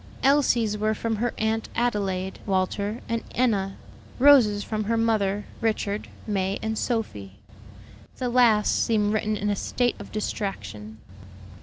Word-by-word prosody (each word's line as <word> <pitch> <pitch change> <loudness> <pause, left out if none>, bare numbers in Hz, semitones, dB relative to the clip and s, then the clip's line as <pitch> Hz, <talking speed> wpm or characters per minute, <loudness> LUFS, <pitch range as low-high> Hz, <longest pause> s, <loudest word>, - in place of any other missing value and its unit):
Elsie's 245 -6 +3
were 215 +1 +1
from 225 0 -2
her 240 +2 0
Aunt 220 +1 -1
Adelaide, 195 -5 -1
Walter, 200 +3 -1
and 230 0 -1
Enna. 200 -6 +1 0.4
Rose's 245 -7 +6
from 215 -1 -3
her 230 +2 +1
mother, 210 -3 +1 0.2
Richard, 215 -2 -1 0.2
May, 195 -2 -1
and 220 0 -1
Sophie. 205 - -3 0.8
The 255 - -2
last 235 -4 +4
seemed 210 -2 +1
written 215 0 0
in 205 +1 -1
a - - 0
state 245 +4 -1
of - - -10
distraction. 110 - -4
215 Hz, 135 wpm, -25 LUFS, 200-230 Hz, 0.8 s, Rose's